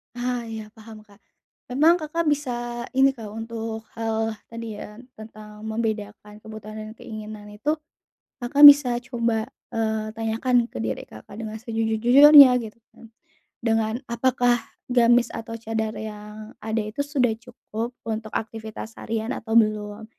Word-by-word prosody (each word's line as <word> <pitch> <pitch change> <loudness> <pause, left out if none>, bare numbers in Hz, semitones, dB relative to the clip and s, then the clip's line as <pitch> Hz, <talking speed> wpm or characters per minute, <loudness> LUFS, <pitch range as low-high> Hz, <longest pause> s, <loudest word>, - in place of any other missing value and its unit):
Ah, 245 -1 -3
iya 220 -1 -7
paham, 220 -1 -13
Kak. 205 -1 -22 0.5
Memang 310 +8 +4
Kakak 315 +2 -2
bisa 240 -4 -3
ini, 270 +1 +5
Kak, 230 -5 -9
untuk 225 +1 -6 0.2
hal 225 0 -1 0.2
tadi 230 -2 -7
ya 210 - -9 0.2
tentang 215 -1 -11
membedakan 215 -2 -4
kebutuhan 215 0 -10
dan 215 0 -7
keinginan 215 -2 -9
itu 280 +9 -1 0.6
Kakak 260 +3 0
bisa 285 -4 +9
coba, 235 -1 -1 0.2
eee, 220 -1 -2
tanyakan 230 +2 +1
ke - - -7
diri 110 -1 -3
Kakak 110 - -13
dengan 220 -1 -6
sejujur-jujurnya 240 +6 +7
gitu 220 0 -10 0.2
kan, 225 - -16 0.5
dengan 225 -1 +1 0.2
apakah 245 0 +2 0.3
gamis 240 -1 +4
atau 225 0 -6
cadar 220 -1 -3
yang 215 0 -8
ada 220 +1 -2
itu 215 +5 -8
sudah 280 -4 +1
cukup 235 0 -7
untuk 220 -1 -4
aktivitas 220 0 -6
harian 225 +1 -3
atau 225 0 -4
belum? 215 -1 +1
225 Hz, 135 wpm, -24 LUFS, 215-240 Hz, 0.6 s, bisa